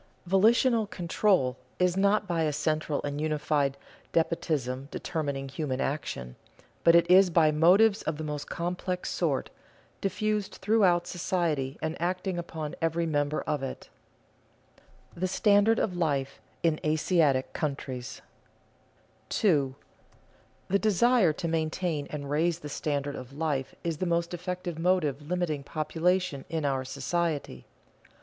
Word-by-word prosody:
Volitional 220 Hz, +4 st, +4 dB
control 175 Hz, -8 st, +1 dB, 0.2 s
is 180 Hz, -1 st, +2 dB
not 200 Hz, +2 st, +2 dB
by 170 Hz, -2 st, 0 dB
a 155 Hz, -2 st, +1 dB
central 155 Hz, 0 st, -1 dB
and 145 Hz, 0 st, -3 dB
unified 150 Hz, -2 st, 0 dB, 0.4 s
despotism 140 Hz, -5 st, 0 dB
determining 140 Hz, -6 st, -3 dB
human 135 Hz, -1 st, -3 dB
action, 65 Hz, -, -3 dB, 0.5 s
but 170 Hz, -, +6 dB
it 170 Hz, -, +5 dB
is 185 Hz, +1 st, +7 dB
by 160 Hz, -2 st, +4 dB
motives 195 Hz, +8 st, +5 dB
of 155 Hz, -, -3 dB
the 155 Hz, -, -5 dB
most 150 Hz, -1 st, -5 dB
complex 180 Hz, +1 st, -3 dB
sort, -, -, -1 dB, 0.5 s
diffused 210 Hz, +1 st, -1 dB
throughout 190 Hz, -4 st, +3 dB
society 165 Hz, -6 st, -1 dB
and 160 Hz, +1 st, -3 dB
acting 180 Hz, +1 st, -1 dB
upon 160 Hz, -2 st, -5 dB
every 165 Hz, +1 st, +1 dB
member 145 Hz, -1 st, 0 dB
of 150 Hz, -2 st, -2 dB
it. 135 Hz, -, -6 dB, 1.2 s
[Sidenote: 170 Hz, -, -13 dB
The 185 Hz, -, +2 dB
standard 205 Hz, +3 st, +4 dB
of 185 Hz, -5 st, 0 dB
life 145 Hz, -6 st, -1 dB, 0.2 s
in 160 Hz, -2 st, +2 dB
Asiatic 155 Hz, -3 st, +2 dB
countries] 130 Hz, -4 st, -4 dB, 1.1 s
2. 145 Hz, -10 st, +2 dB, 1.0 s
_The 200 Hz, -, +3 dB
desire 220 Hz, -2 st, +4 dB
to 170 Hz, -, -4 dB
maintain 160 Hz, -1 st, -1 dB
and 145 Hz, -2 st, -5 dB
raise 160 Hz, +4 st, +1 dB
the 150 Hz, -, -7 dB
standard 145 Hz, -1 st, -2 dB
of 130 Hz, +1 st, -9 dB
life 145 Hz, -4 st, -2 dB
is 165 Hz, -2 st, -2 dB
the 185 Hz, -, -1 dB
most 170 Hz, 0 st, 0 dB
effective 180 Hz, -1 st, -4 dB
motive 165 Hz, -5 st, +1 dB
limiting 160 Hz, -2 st, -2 dB
population 160 Hz, +1 st, -1 dB
in 160 Hz, -2 st, -2 dB
our 135 Hz, -2 st, 0 dB
society. 145 Hz, -, -3 dB
160 Hz, 130 wpm, -28 LUFS, 145-180 Hz, 1.2 s, is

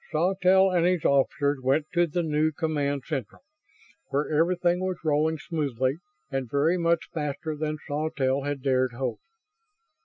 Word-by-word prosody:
Sawtelle 190 Hz, +3 st, +3 dB
and 175 Hz, -2 st, +2 dB
his 180 Hz, -2 st, +1 dB
officers 140 Hz, +1 st, +2 dB
went 135 Hz, +4 st, +2 dB
to 175 Hz, 0 st, +3 dB
the 170 Hz, +3 st, -1 dB
new 155 Hz, 0 st, +1 dB
Command 145 Hz, -3 st, -1 dB
Central, 135 Hz, -, -5 dB, 0.6 s
where 145 Hz, +3 st, -1 dB
everything 175 Hz, +2 st, +2 dB
was 185 Hz, -1 st, -2 dB
rolling 155 Hz, +1 st, +2 dB
smoothly 140 Hz, -4 st, -1 dB, 0.3 s
and 135 Hz, -3 st, -2 dB
very 145 Hz, +7 st, +2 dB
much 170 Hz, -1 st, +1 dB
faster 150 Hz, 0 st, -3 dB
than 155 Hz, 0 st, -3 dB
Sawtelle 145 Hz, -3 st, 0 dB
had 145 Hz, -1 st, -4 dB
dared 130 Hz, -2 st, +1 dB
hope. 125 Hz, -2 st, -3 dB
150 Hz, 145 wpm, -26 LUFS, 140-170 Hz, 0.6 s, Sawtelle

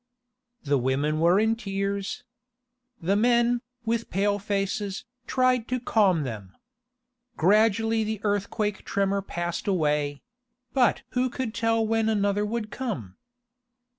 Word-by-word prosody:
The 140 Hz, -2 st, +2 dB
women 140 Hz, +5 st, 0 dB
were 170 Hz, +4 st, +4 dB
in 220 Hz, +1 st, +2 dB
tears. 200 Hz, -2 st, -3 dB, 0.8 s
The 185 Hz, +4 st, +1 dB
men, 240 Hz, +2 st, +3 dB, 0.2 s
with 230 Hz, 0 st, -1 dB
pale 205 Hz, +1 st, +1 dB
faces, 200 Hz, +1 st, -2 dB, 0.2 s
tried 255 Hz, -2 st, +2 dB
to 255 Hz, 0 st, -1 dB
calm 200 Hz, -9 st, +2 dB
them. 105 Hz, -7 st, -7 dB, 0.8 s
Gradually 220 Hz, +4 st, +3 dB
the 215 Hz, -1 st, -3 dB
earthquake 205 Hz, 0 st, -1 dB
tremor 200 Hz, 0 st, 0 dB
passed 175 Hz, -2 st, -4 dB
away; 150 Hz, -6 st, 0 dB, 0.5 s
but 255 Hz, -3 st, +3 dB
who 255 Hz, +1 st, +1 dB
could 245 Hz, -2 st, -4 dB
tell 225 Hz, -1 st, +1 dB
when 225 Hz, 0 st, +1 dB
another 205 Hz, -1 st, +1 dB
would 220 Hz, -1 st, -3 dB
come? 130 Hz, -, -5 dB
205 Hz, 120 wpm, -26 LUFS, 185-225 Hz, 0.8 s, were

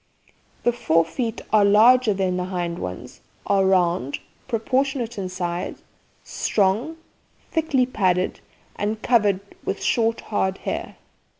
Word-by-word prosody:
The 240 Hz, -, +4 dB
fore 165 Hz, -8 st, +2 dB
feet 225 Hz, +6 st, -3 dB
are 215 Hz, -1 st, +6 dB
larger 225 Hz, +4 st, +6 dB
than 190 Hz, -2 st, 0 dB
the 180 Hz, 0 st, -2 dB
hind 175 Hz, -2 st, -3 dB
ones, 90 Hz, 0 st, -7 dB, 0.2 s
are 195 Hz, -1 st, +3 dB
round, 175 Hz, -7 st, +2 dB, 0.3 s
proportionate 250 Hz, 0 st, -1 dB
in 185 Hz, -1 st, -3 dB
size, 175 Hz, -1 st, -4 dB, 0.4 s
strong, 220 Hz, +11 st, 0 dB, 0.5 s
thickly 300 Hz, -6 st, +2 dB
padded, 185 Hz, -7 st, 0 dB, 0.4 s
and 210 Hz, +2 st, -2 dB
covered 205 Hz, -6 st, +3 dB, 0.2 s
with 195 Hz, -, -3 dB
short 230 Hz, -1 st, +1 dB
hard 190 Hz, -2 st, -1 dB
hair. -, -, -4 dB
200 Hz, 120 wpm, -23 LUFS, 185-235 Hz, 0.5 s, are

